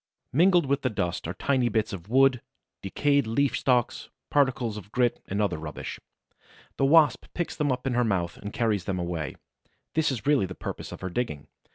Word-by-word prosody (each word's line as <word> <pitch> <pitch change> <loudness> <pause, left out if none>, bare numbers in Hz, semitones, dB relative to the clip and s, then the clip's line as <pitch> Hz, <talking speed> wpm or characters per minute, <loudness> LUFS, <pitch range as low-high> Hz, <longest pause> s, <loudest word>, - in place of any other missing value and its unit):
Mingled 175 +3 +5
with 140 +1 0
this 130 -4 -1
dust 85 -4 -2
are 90 - -4
tiny 130 +2 +1
bits 110 -2 0
of 95 +1 -8
wood, 135 0 +4 0.4
decayed 140 +6 +1
leaf 135 +5 +1
stalks, 125 -3 0 0.2
particles 130 -6 +2
of 105 -1 -9
grit 125 -1 +1
and 100 - -2
other 100 -7 0
rubbish. 75 -2 -6 0.8
The 135 - +2
Wasp 150 -2 +5
picks 175 - -2
them 150 -3 0
up 125 0 -3
in 135 - 0
her 120 +1 +2
mouth 90 -6 -1
and 105 - -7
carries 105 -6 0
them 95 -2 -2
away. 85 -5 -3 0.6
This 160 -3 +2
is 115 -5 -5
really 140 -9 +3
the 90 - -8
purpose - - -6
of - - -9
her 95 - -3
digging. 75 - -3
120 Hz, 195 wpm, -27 LUFS, 95-135 Hz, 0.8 s, Mingled